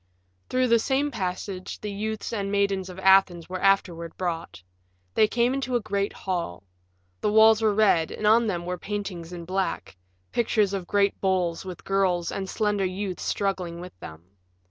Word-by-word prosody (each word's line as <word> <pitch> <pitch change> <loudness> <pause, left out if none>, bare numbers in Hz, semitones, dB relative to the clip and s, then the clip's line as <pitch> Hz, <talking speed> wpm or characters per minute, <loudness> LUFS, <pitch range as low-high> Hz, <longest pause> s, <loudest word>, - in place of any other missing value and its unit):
Through 255 -1 +1
the 230 0 +5
same 280 +4 0
passage 185 -3 -4
the 210 - -5
youths 215 +2 -4
and 200 -3 -2
maidens 200 -2 0
of 180 - -9
Athens 190 -3 +4
were 185 0 -5
afterward 180 -4 +1
brought. 165 - -4 0.5
They 215 - +4
came 240 +3 +1
into 265 -2 -2
a - - +3
great 200 -2 -1
hall. 170 - -4 0.6
The 210 - 0
walls 220 0 +6
were 215 -2 +2
red 195 -7 +4
and 215 - -5
on 225 +2 +5
them 175 -4 -2
were 180 0 -3
paintings 195 -5 -5
in 170 -1 -7
black 190 - -2 0.4
pictures 215 -4 +1
of 190 -3 -3
great 200 -1 +1
bulls 185 -3 0
with 180 -2 -8
girls 185 -3 +1
and 190 -1 -4
slender 210 -2 0
youths 185 0 -3
struggling 185 -4 -2
with 180 +1 -9
them. 80 +1 -10
195 Hz, 170 wpm, -26 LUFS, 180-215 Hz, 0.6 s, walls